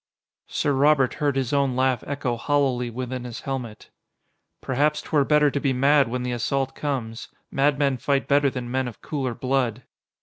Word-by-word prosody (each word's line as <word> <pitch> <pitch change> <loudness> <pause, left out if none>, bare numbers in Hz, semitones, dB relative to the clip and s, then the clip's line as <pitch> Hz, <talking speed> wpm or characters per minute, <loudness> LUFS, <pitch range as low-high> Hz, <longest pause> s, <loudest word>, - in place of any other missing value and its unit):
Sir 145 - 0
Robert 140 -1 +3
heard 145 -2 +1
his 135 -1 -1
own 140 -3 +2
laugh 130 -2 +1
echo 135 -4 -2
hollowly 130 -1 0
within 125 +1 -5
his 120 -2 -7
helmet. 125 -6 -6 0.7
"Perhaps 150 +3 0
'twere 150 -3 +2
better 150 0 +3
to 140 - -1
be 135 -1 0
mad 140 +1 +4
when 125 +2 -3
the 125 - -2
assault 135 +3 -1
comes. 120 -6 -4 0.2
Madmen 140 -1 +2
fight 140 +2 0
better 140 0 +3
than 125 -2 -6
men 130 0 0
of 120 - -10
cooler 135 -5 -3
blood." 130 -2 -1
135 Hz, 170 wpm, -24 LUFS, 125-140 Hz, 0.7 s, mad